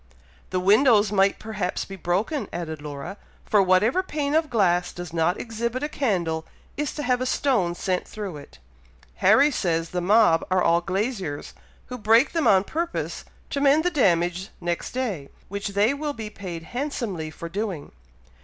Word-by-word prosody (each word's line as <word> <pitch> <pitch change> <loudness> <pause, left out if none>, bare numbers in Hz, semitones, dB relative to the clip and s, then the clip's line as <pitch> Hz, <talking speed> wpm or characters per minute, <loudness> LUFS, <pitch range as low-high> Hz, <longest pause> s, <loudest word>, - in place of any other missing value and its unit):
"The 185 - -1
windows 210 +2 +4
might 195 -1 +3
perhaps 210 -4 -3
be 195 - -8
broken," 195 - -1
added 160 -3 -5
Laura; 150 +6 -7 0.3
"for 210 - +4
whatever 195 - +3
pane 295 -6 -2
of 315 -1 +2
glass 180 -6 +2
does 175 -2 -8
not 170 +2 +1
exhibit 235 +3 -3
a - - +1
candle, 180 - -1 0.3
is 295 -1 -3
to 295 - -4
have 250 -1 +1
a 255 - 0
stone 220 -12 +1
sent 180 +1 -2
through 200 -7 -6
it. 140 - -13 0.6
Harry 240 +10 +5
says 165 - -1
the 180 - -1
mob 195 -3 +4
are 185 0 +2
all 170 +1 +3
glaziers, 190 - -3 0.3
who 250 0 -7
break 225 +5 +4
them 330 -3 +1
on 190 -1 +5
purpose 335 +9 -3 0.3
to 280 - -1
mend 290 +2 +4
the 355 - +1
damage 180 - +1
next 175 -1 -3
day, 210 - -3 0.2
which 200 +1 -4
they 200 +5 +2
will 295 +1 -3
be 220 -4 -7
paid 175 -6 -7
handsomely 235 - -3
for 170 +2 -8
doing." 190 -3 -4
200 Hz, 170 wpm, -24 LUFS, 175-250 Hz, 0.6 s, Harry